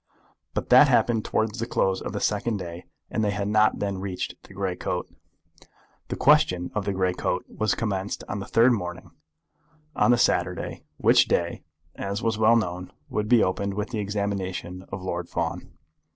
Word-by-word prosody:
But -, -, -2 dB
that -, -, +8 dB
happened 115 Hz, -3 st, +3 dB
towards 110 Hz, +1 st, -1 dB
the 115 Hz, -, -2 dB
close 95 Hz, -5 st, +1 dB
of -, -, -4 dB
the -, -, -3 dB
second 105 Hz, +1 st, 0 dB
day, 85 Hz, -2 st, -7 dB, 0.3 s
and 110 Hz, -, 0 dB
they 105 Hz, -, +2 dB
had 100 Hz, 0 st, -2 dB
not 110 Hz, +1 st, +3 dB
then 100 Hz, -2 st, -2 dB
reached 95 Hz, -1 st, -4 dB
the -, -, -15 dB
grey 95 Hz, -2 st, -2 dB
coat. -, -, -3 dB, 1.0 s
The -, -, -3 dB
question 90 Hz, -1 st, +3 dB
of 105 Hz, -2 st, -2 dB
the 100 Hz, -, 0 dB
grey 95 Hz, -1 st, 0 dB
coat 90 Hz, 0 st, -2 dB
was 110 Hz, 0 st, -1 dB
commenced 100 Hz, -3 st, -2 dB
on 105 Hz, -, -3 dB
the 100 Hz, -, -6 dB
third 120 Hz, +2 st, +5 dB
morning, 90 Hz, -4 st, -5 dB, 0.8 s
on -, -, +3 dB
the 120 Hz, -, +5 dB
Saturday, -, -, 0 dB, 0.2 s
which -, -, +5 dB
day, 85 Hz, 0 st, 0 dB, 0.3 s
as 100 Hz, +2 st, -4 dB
was 115 Hz, -1 st, 0 dB
well 110 Hz, +1 st, +6 dB
known, 90 Hz, -5 st, -2 dB, 0.2 s
would 105 Hz, 0 st, -2 dB
be 120 Hz, -2 st, +6 dB
opened 100 Hz, +1 st, -1 dB
with 105 Hz, +1 st, -3 dB
the 110 Hz, -, -2 dB
examination 100 Hz, -3 st, -3 dB
of 95 Hz, -1 st, -5 dB
Lord 85 Hz, -2 st, -3 dB
Fawn. -, -, -3 dB
100 Hz, 180 wpm, -25 LUFS, 95-110 Hz, 1.0 s, that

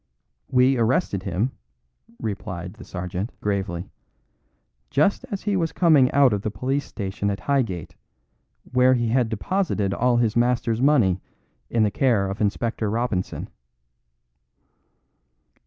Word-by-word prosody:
"We 130 Hz, 0 st, +4 dB
arrested 115 Hz, -, +1 dB
him," 95 Hz, +7 st, -1 dB, 0.7 s
replied 95 Hz, -4 st, -5 dB
the 110 Hz, -, -12 dB
sergeant 90 Hz, +3 st, -5 dB
gravely, 100 Hz, -3 st, -2 dB, 1.0 s
"just 150 Hz, +8 st, +2 dB
as 200 Hz, -, -5 dB
he 205 Hz, -1 st, 0 dB
was 165 Hz, -4 st, 0 dB
coming 155 Hz, -7 st, +4 dB
out 140 Hz, -4 st, +5 dB
of 100 Hz, -, -1 dB
the 105 Hz, -, -2 dB
police 135 Hz, +6 st, -2 dB
station 100 Hz, -1 st, -3 dB
at 100 Hz, -, -3 dB
Highgate, 115 Hz, -, -1 dB, 0.8 s
where 130 Hz, 0 st, +5 dB
he 120 Hz, -2 st, 0 dB
had 120 Hz, -1 st, +2 dB
deposited 110 Hz, -, -1 dB
all 125 Hz, +3 st, +2 dB
his 115 Hz, -2 st, +1 dB
master's 120 Hz, -1 st, +1 dB
money 115 Hz, -11 st, +3 dB, 0.5 s
in 115 Hz, -2 st, +2 dB
the 105 Hz, -, +2 dB
care 115 Hz, -7 st, +2 dB
of 100 Hz, -, -6 dB
Inspector 110 Hz, +1 st, -1 dB
Robinson." 110 Hz, -4 st, -2 dB
115 Hz, 125 wpm, -24 LUFS, 100-130 Hz, 1.0 s, out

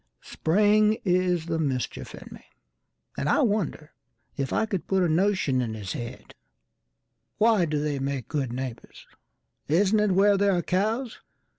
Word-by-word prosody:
Spring 210 Hz, +5 st, +2 dB
is 180 Hz, -2 st, +1 dB
the 165 Hz, -1 st, -2 dB
mischief 135 Hz, -5 st, -3 dB
in -, -, -12 dB
me, -, -, -12 dB, 0.7 s
and 145 Hz, -, -2 dB
I -, -, +4 dB
wonderIf 155 Hz, -, -4 dB
I -, -, +1 dB
could 195 Hz, -6 st, -4 dB
put 190 Hz, -1 st, +2 dB
a -, -, +2 dB
notion 165 Hz, -6 st, +1 dB
in 115 Hz, -3 st, -3 dB
his 100 Hz, -4 st, -5 dB
head:"Why 120 Hz, -, -4 dB
do 155 Hz, -2 st, -2 dB
they 145 Hz, -2 st, -2 dB
make 135 Hz, -3 st, -3 dB
good 140 Hz, -6 st, -2 dB
neighbours? 125 Hz, -1 st, -7 dB, 0.6 s
Isn't 195 Hz, +7 st, +3 dB
itWhere 200 Hz, 0 st, +3 dB
there 200 Hz, -1 st, +3 dB
are 175 Hz, -, -1 dB
cows? 220 Hz, +7 st, -1 dB
170 Hz, 140 wpm, -26 LUFS, 135-205 Hz, 0.7 s, I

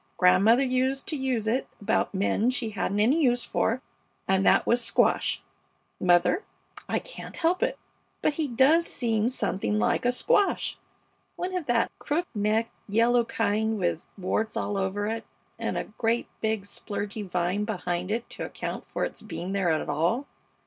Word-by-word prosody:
Grandmother 195 Hz, +8 st, +5 dB
used 260 Hz, +1 st, 0 dB
to 315 Hz, -, -2 dB
use 260 Hz, -5 st, -1 dB
it 240 Hz, +4 st, 0 dB
about 210 Hz, +2 st, +1 dB
men 205 Hz, +4 st, +1 dB
she 245 Hz, -3 st, -1 dB
hadn't 200 Hz, 0 st, -1 dB
any 260 Hz, +10 st, +4 dB
use 245 Hz, -4 st, +3 dB
for, 250 Hz, +4 st, 0 dB, 0.4 s
and 190 Hz, 0 st, +3 dB
that -, -, +5 dB
was 240 Hz, +1 st, +3 dB
"squash." -, -, +2 dB, 0.6 s
Mother, 180 Hz, -, +3 dB, 0.5 s
I -, -, +1 dB
can't -, -, -8 dB
help 350 Hz, +2 st, +1 dB
it, -, -, 0 dB, 0.5 s
but -, -, +3 dB
he 305 Hz, 0 st, -1 dB
does 275 Hz, +7 st, +4 dB
seem 225 Hz, -2 st, 0 dB
something 210 Hz, -4 st, -1 dB
like -, -, +1 dB
a 245 Hz, -, +3 dB
squash. 405 Hz, -, +1 dB, 0.6 s
One 370 Hz, +1 st, -3 dB
of 355 Hz, -5 st, -3 dB
that 240 Hz, -1 st, +2 dB
crook 330 Hz, +4 st, -1 dB
necked, 215 Hz, +2 st, +1 dB, 0.2 s
yellow 235 Hz, +3 st, +4 dB
kind 220 Hz, 0 st, 0 dB
with 175 Hz, -3 st, -1 dB
warts 210 Hz, +4 st, -1 dB
all 205 Hz, -, -1 dB
over 195 Hz, +1 st, -1 dB
it, 225 Hz, +1 st, -2 dB, 0.4 s
and -, -, -2 dB
a -, -, -1 dB
great, 225 Hz, +2 st, -1 dB
big, 220 Hz, -2 st, 0 dB
splurgy 205 Hz, +1 st, -5 dB
vine 180 Hz, +3 st, 0 dB
behind 180 Hz, -4 st, -2 dB
it 225 Hz, +2 st, -2 dB
to -, -, -5 dB
account -, -, -5 dB
for -, -, -1 dB
its -, -, -6 dB
being 180 Hz, +2 st, -5 dB
there 195 Hz, -3 st, +1 dB
at 160 Hz, -1 st, 0 dB
all. 180 Hz, -, 0 dB
225 Hz, 165 wpm, -27 LUFS, 200-255 Hz, 0.6 s, Grandmother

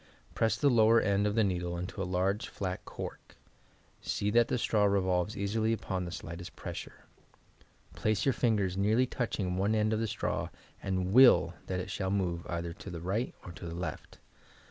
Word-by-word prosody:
Press 110 Hz, -1 st, +1 dB
the 145 Hz, -, +2 dB
lower 115 Hz, -1 st, +6 dB
end 100 Hz, -1 st, +2 dB
of 105 Hz, -, -1 dB
the 115 Hz, -, +4 dB
needle 90 Hz, -3 st, -1 dB
into 90 Hz, +3 st, -5 dB
a -, -, -1 dB
large, 95 Hz, +3 st, 0 dB
flat 95 Hz, -2 st, -4 dB
cork; -, -, -8 dB, 0.7 s
see 105 Hz, 0 st, -1 dB
that 120 Hz, +1 st, +4 dB
the -, -, 0 dB
straw 105 Hz, -3 st, +2 dB
revolves 95 Hz, 0 st, +1 dB
easily 110 Hz, +3 st, 0 dB
upon 95 Hz, -4 st, -3 dB
the 85 Hz, -, -6 dB
slightest 85 Hz, 0 st, -7 dB
pressure. -, -, -8 dB, 0.9 s
Place 110 Hz, -1 st, 0 dB
your 135 Hz, -, +3 dB
fingers 105 Hz, -7 st, +1 dB
nearly 110 Hz, +6 st, +3 dB
touching 100 Hz, -8 st, -2 dB
one 100 Hz, +3 st, +2 dB
end 110 Hz, 0 st, +2 dB
of 110 Hz, -, 0 dB
the 115 Hz, -, 0 dB
straw -, -, -2 dB, 0.3 s
and 95 Hz, -1 st, -1 dB
icill 120 Hz, -9 st, +7 dB
that 95 Hz, -1 st, -2 dB
it 90 Hz, +1 st, -5 dB
shall 95 Hz, 0 st, -2 dB
move 90 Hz, -4 st, -1 dB
either 85 Hz, -1 st, -3 dB
to -, -, -10 dB
the 85 Hz, -, -6 dB
right 100 Hz, +8 st, -2 dB
or 90 Hz, -, -7 dB
to 85 Hz, +1 st, -8 dB
the 85 Hz, -, -6 dB
left. 85 Hz, -3 st, -6 dB
100 Hz, 190 wpm, -31 LUFS, 90-110 Hz, 0.9 s, icill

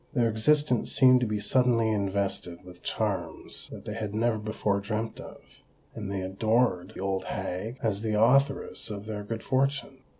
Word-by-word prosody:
Their 120 Hz, -2 st, +3 dB
existence 130 Hz, +3 st, +2 dB
seemed 130 Hz, -2 st, +6 dB
to 125 Hz, -, 0 dB
be 105 Hz, 0 st, -1 dB
suddenly 115 Hz, +1 st, +3 dB
invested 100 Hz, -3 st, -1 dB
with 90 Hz, -1 st, -13 dB
charms 95 Hz, -7 st, -3 dB
that -, -, -9 dB
they -, -, -4 dB
had 105 Hz, -1 st, -4 dB
never 115 Hz, 0 st, +1 dB
before 105 Hz, -1 st, -1 dB
dreamt 110 Hz, +3 st, -3 dB
of; -, -, -11 dB, 0.5 s
and 105 Hz, -3 st, -5 dB
they 100 Hz, -1 st, -2 dB
adored 110 Hz, 0 st, +1 dB
the -, -, -6 dB
old 95 Hz, -1 st, -1 dB
hag 110 Hz, +8 st, -4 dB
as 105 Hz, -3 st, 0 dB
the 110 Hz, -1 st, 0 dB
authoress 135 Hz, +4 st, +2 dB
of 105 Hz, -1 st, -6 dB
their 105 Hz, -1 st, -5 dB
good 110 Hz, +2 st, -5 dB
fortune. 135 Hz, 0 st, 0 dB
110 Hz, 170 wpm, -28 LUFS, 100-120 Hz, 0.5 s, seemed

